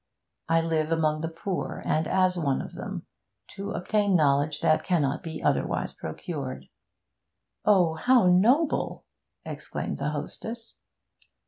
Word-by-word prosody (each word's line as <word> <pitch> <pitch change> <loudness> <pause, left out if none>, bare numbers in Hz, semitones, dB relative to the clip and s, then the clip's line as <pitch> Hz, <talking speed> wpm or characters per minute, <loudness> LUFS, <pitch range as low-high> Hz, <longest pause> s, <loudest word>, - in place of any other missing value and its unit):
I 165 0 +4
live 160 -1 0
among 155 -2 +1
the 165 - -2
poor, 170 +3 -4
and 155 +1 +1
as 185 0 +3
one 145 -6 0
of - - -7
them, - - -6 0.4
to 200 0 -5
obtain 205 +1 +1
knowledge 145 -1 +2
that 155 - +3
cannot 150 -6 +1
be 165 -3 -6
otherwise - - 0
procured.' 130 - -6 1.0
'Oh, 185 -6 +4
how 245 +7 +4
noble!' 235 - +3 0.4
exclaimed - - -5
the - - -1
hostess. 230 0 -6
165 Hz, 125 wpm, -27 LUFS, 155-195 Hz, 1.0 s, I